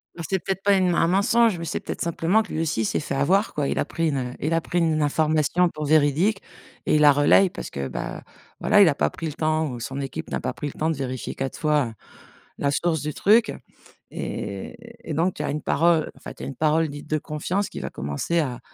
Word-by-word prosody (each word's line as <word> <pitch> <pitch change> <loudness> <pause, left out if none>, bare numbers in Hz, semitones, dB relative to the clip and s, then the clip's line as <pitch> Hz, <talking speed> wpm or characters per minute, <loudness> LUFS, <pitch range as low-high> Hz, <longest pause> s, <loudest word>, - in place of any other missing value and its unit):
Bah, 170 - -6
c'est 190 -1 0
peut-être 195 +2 -3
pas 200 0 +4
une 185 -1 +2
m 175 - +1
un 165 - +3
mensonge, 215 +2 +3
mais 170 - -5
c'est 150 - -2
peut-être - - -6
simplement 170 +5 +2
que - - -12
lui 160 - -1
aussi 115 -9 0
s'est - - 0
fait - - -4
avoir 190 +10 +2
quoi. 145 -2 -1
Il - - -2
a - - +1
pris 165 -1 -1
une, 140 - -1
heu, 125 -1 -3
il 155 +3 -1
a 165 - +2
pris 175 +2 -1
une 160 -2 +1
information 155 +3 +2
pour 155 -2 -5
véridique 155 +7 +3 0.4
et - - +2
il 150 - +3
la 145 -1 +8
relaye 145 +7 +5
parce - - -7
que, 70 -1 -4
bah, 65 - -5 0.4
voilà, 205 -1 +4
il 190 - +8
a 145 - +2
pas - - +1
pris 165 - -6
le 150 - -4
temps 155 0 0
ou 120 -1 -6
son 135 +4 -5
équipe 135 -1 -6
n'a - - -2
pas - - -3
pris 150 - -5
le - - -6
temps 160 +1 +1
de 160 - 0
vérifier 130 -2 -4
4 135 0 -4
fois, 150 -4 +2
heu, 115 - -8 0.7
la 140 0 +1
source 160 -1 0
du 150 -1 -3
truc 220 +3 +3 0.6
et 100 -2 -5 0.3
et - - -1
donc 175 +4 +1
tu 150 - -4
as - - -1
une 150 0 -3
parole, 165 +1 +2
enfin - - -9
tu - - -11
as - - -3
une 135 - -6
parole 155 0 +2
dite 145 +1 -9
de 155 - +1
confiance 170 +7 -2
qui - - -7
va - - -4
commencer 70 - -2
à 130 -6 -2
155 Hz, 260 wpm, -24 LUFS, 145-175 Hz, 0.7 s, la